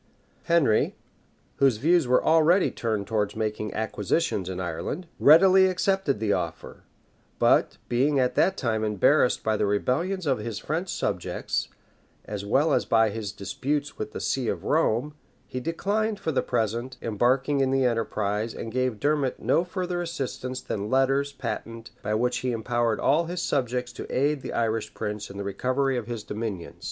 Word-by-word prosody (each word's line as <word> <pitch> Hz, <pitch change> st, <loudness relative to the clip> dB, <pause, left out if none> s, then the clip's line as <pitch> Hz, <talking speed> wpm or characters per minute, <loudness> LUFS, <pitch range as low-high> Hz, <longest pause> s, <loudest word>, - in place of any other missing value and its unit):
Henry, 165 Hz, -11 st, +3 dB, 0.6 s
whose 135 Hz, -5 st, +3 dB
views 165 Hz, +3 st, +3 dB
were 125 Hz, +1 st, +3 dB
already 165 Hz, +4 st, +4 dB
turned 110 Hz, -3 st, -2 dB
towards 105 Hz, -1 st, -1 dB
making 105 Hz, -1 st, -2 dB
acquisitions 105 Hz, -, -1 dB
in 95 Hz, -1 st, -4 dB
Ireland, 85 Hz, -, -4 dB
readily 190 Hz, +5 st, +7 dB
accepted 185 Hz, -, 0 dB
the 105 Hz, -2 st, +1 dB
offer; 85 Hz, -, -4 dB, 0.6 s
but -, -, +3 dB
being 135 Hz, +4 st, +2 dB
at 125 Hz, -1 st, +2 dB
that 190 Hz, +7 st, +2 dB
time 110 Hz, -4 st, -1 dB
embarrassed 105 Hz, -3 st, +3 dB
by 110 Hz, -1 st, +1 dB
the 105 Hz, -, +1 dB
rebellions 165 Hz, -, 0 dB
of 135 Hz, -5 st, +1 dB
his 110 Hz, 0 st, -4 dB
French 165 Hz, -, -3 dB
subjects, -, -, -2 dB, 0.6 s
as 105 Hz, -1 st, -5 dB
well 135 Hz, +10 st, +2 dB
as 125 Hz, -, +2 dB
by 110 Hz, +1 st, +3 dB
his 105 Hz, -2 st, -4 dB
disputes 140 Hz, +8 st, -3 dB
with 105 Hz, 0 st, -4 dB
the -, -, -6 dB
see 130 Hz, -3 st, -1 dB
of -, -, -2 dB
Rome, 150 Hz, -2 st, +1 dB, 0.3 s
he 130 Hz, -, -4 dB
declined, 205 Hz, -, -1 dB
for 160 Hz, -, -2 dB
the 135 Hz, -, +1 dB
present, 120 Hz, +2 st, -2 dB
embarking 130 Hz, +6 st, +1 dB
in 135 Hz, -1 st, +2 dB
the 135 Hz, -1 st, +2 dB
enterprise, 110 Hz, -2 st, -1 dB
and 115 Hz, -, -6 dB
gave 130 Hz, -3 st, -1 dB
Dermot 145 Hz, -3 st, 0 dB
no 170 Hz, -, +2 dB
further 180 Hz, 0 st, -3 dB
assistance 130 Hz, -6 st, -4 dB
than 105 Hz, 0 st, -4 dB
letters 135 Hz, +2 st, +2 dB
patent, 115 Hz, -3 st, -6 dB
by 105 Hz, +1 st, -1 dB
which 125 Hz, +2 st, +1 dB
he 130 Hz, -1 st, -1 dB
empowered 115 Hz, -1 st, 0 dB
all 155 Hz, +5 st, +3 dB
his 175 Hz, +1 st, -4 dB
subjects 125 Hz, -2 st, -1 dB
to -, -, -8 dB
aid 145 Hz, +2 st, +1 dB
the -, -, -6 dB
Irish 110 Hz, -2 st, -1 dB
prince 105 Hz, -1 st, -4 dB
in 100 Hz, -, -9 dB
the 100 Hz, -, -3 dB
recovery 130 Hz, +7 st, 0 dB
of 120 Hz, -3 st, -3 dB
his 115 Hz, -3 st, -5 dB
dominions. 105 Hz, -6 st, -5 dB
125 Hz, 165 wpm, -26 LUFS, 110-150 Hz, 0.6 s, readily